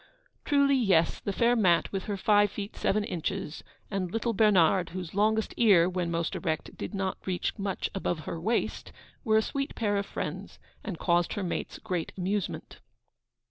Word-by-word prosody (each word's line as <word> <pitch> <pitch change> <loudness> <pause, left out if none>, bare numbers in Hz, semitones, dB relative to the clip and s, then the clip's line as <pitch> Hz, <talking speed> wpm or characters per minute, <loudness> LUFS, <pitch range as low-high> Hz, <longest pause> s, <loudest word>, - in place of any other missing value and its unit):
Truly, 280 -1 +4
yes; 190 -9 +3
the 200 - -3
fair 235 +4 +3
Mat 185 -7 +3
with 195 -2 -3
her 205 -2 -3
five 205 +1 +4
feet 205 +1 -6
seven 210 +1 +1
inches, 185 -2 -4 0.3
and 190 -3 -1
little 230 +2 -1
Bernard, 190 -4 +4
whose 180 -2 -6
longest 215 +2 +1
ear, 195 -7 +6
when 180 -2 -2
most 170 -1 -1
erect, 155 -1 -3
did - - -6
not 190 -1 -2
reach 180 -2 -1
much 195 -2 -2
above 175 -4 -2
her 165 +1 -5
waist, 225 +6 -1 0.3
were 220 -4 +3
a 220 - +3
sweet 275 +4 -3
pair 205 -3 0
of 200 - -2
friends, - - -5 0.3
and 190 -6 -5
caused 175 0 +1
her 205 - -3
mates 175 - -3
great 175 -3 -3
amusement. 195 +1 -3
195 Hz, 175 wpm, -28 LUFS, 175-215 Hz, 0.3 s, ear